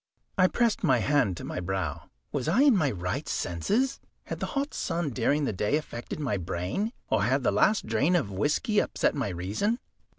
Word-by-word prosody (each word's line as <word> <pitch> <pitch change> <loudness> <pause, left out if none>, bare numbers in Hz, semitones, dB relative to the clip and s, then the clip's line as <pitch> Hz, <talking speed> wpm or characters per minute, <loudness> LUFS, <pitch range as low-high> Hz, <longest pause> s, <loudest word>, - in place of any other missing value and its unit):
I 185 -1 +5
pressed 235 +1 +1
my 135 -8 +4
hand 120 - +2
to - - -7
my - - -4
brow. 95 +1 -3 0.2
Was 140 -1 -2
I 210 - +4
in 280 -5 +6
my 155 -7 +2
right 90 -5 -3
senses? 215 - 0 0.2
Had - - -6
the - - -2
hot 280 +1 -1
sun 165 -4 -2
during 140 +5 +1
the 110 - -1
day 105 +8 +1
affected 120 -3 -6
my 130 -9 0
brain, 90 - -2 0.2
or - - +3
had 130 +6 +2
the - - +3
last 195 - +3
drain 125 +11 +2
of 135 - 0
whisky 150 - +1
upset - - +1
my 135 -7 -1
reason? 100 - -1
140 Hz, 195 wpm, -28 LUFS, -, 0.2 s, in